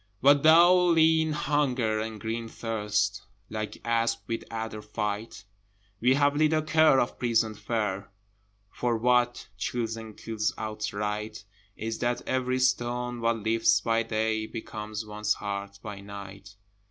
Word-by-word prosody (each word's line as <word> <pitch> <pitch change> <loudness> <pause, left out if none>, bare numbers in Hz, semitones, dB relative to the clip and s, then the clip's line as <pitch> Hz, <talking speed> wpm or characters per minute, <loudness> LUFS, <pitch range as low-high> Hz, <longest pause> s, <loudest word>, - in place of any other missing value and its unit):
But 140 +3 +5
though 175 +3 +7
lean 160 -1 +4
Hunger 130 -7 0
and 110 0 -4
green 115 +1 -3
Thirst 105 -3 -1 0.3
Like 110 -1 -4
asp 115 0 +1
with 115 - -3
adder 110 -1 -5
fight, 105 0 -4 0.5
We 125 +4 +4
have 145 0 +3
little 155 +1 +3
care 155 -3 +5
of 120 - -1
prison 115 -2 +1
fare, 105 -3 -3 0.6
For 120 -2 -1
what 125 +1 +2
chills 115 0 -2
and 110 -2 -9
kills 110 +2 -2
outright 105 0 -4 0.3
Is 110 +1 -4
that 120 0 -1
every 130 0 0
stone 125 -1 0
one 115 -2 0
lifts 115 0 +3
by 115 0 +1
day 110 -1 -1
Becomes 110 -1 -6
one's 105 0 -1
heart 100 -1 -5
by 105 -2 -6
night. 100 0 -10
115 Hz, 135 wpm, -28 LUFS, 105-125 Hz, 0.6 s, though